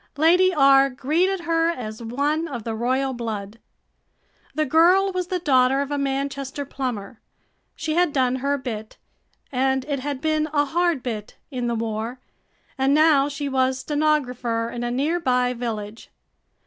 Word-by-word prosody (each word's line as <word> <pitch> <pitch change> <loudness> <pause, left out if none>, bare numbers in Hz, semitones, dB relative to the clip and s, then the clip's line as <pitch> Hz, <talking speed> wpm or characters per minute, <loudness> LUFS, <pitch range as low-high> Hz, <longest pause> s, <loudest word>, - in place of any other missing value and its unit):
Lady 355 +5 +5
R. 275 -3 +5
greeted 330 +9 0
her 330 -1 +1
as 220 -8 -5
one 285 +8 -1
of 245 -7 -6
the 225 - -3
royal 260 +4 0
blood. 220 -3 -5 1.0
The 310 - +1
girl 355 +7 +4
was 365 -1 -2
the 370 -1 -1
daughter 270 -5 +3
of 280 0 -2
a 290 - 0
Manchester 275 0 -3
plumber. 245 -6 -5 0.5
She 315 -1 -3
had 350 -1 +2
done 260 -2 +1
her 280 +2 0
bit, 220 -5 -6 0.5
and 265 0 +1
it 285 -2 -2
had 280 0 -4
been 310 +1 0
a 290 -1 +3
hard 340 -2 0
bit, 215 -4 -5
in 250 -2 -2
the 235 - -1
war, 225 +2 -3 0.6
and 270 +2 +3
now 300 -2 +4
she 285 0 -4
was 260 -1 +1
stenographer 255 -6 0
in 240 - -5
a 240 - -1
near 290 +8 0
by 250 -5 +1
village. 225 -3 -5
270 Hz, 160 wpm, -23 LUFS, 245-310 Hz, 1.0 s, Lady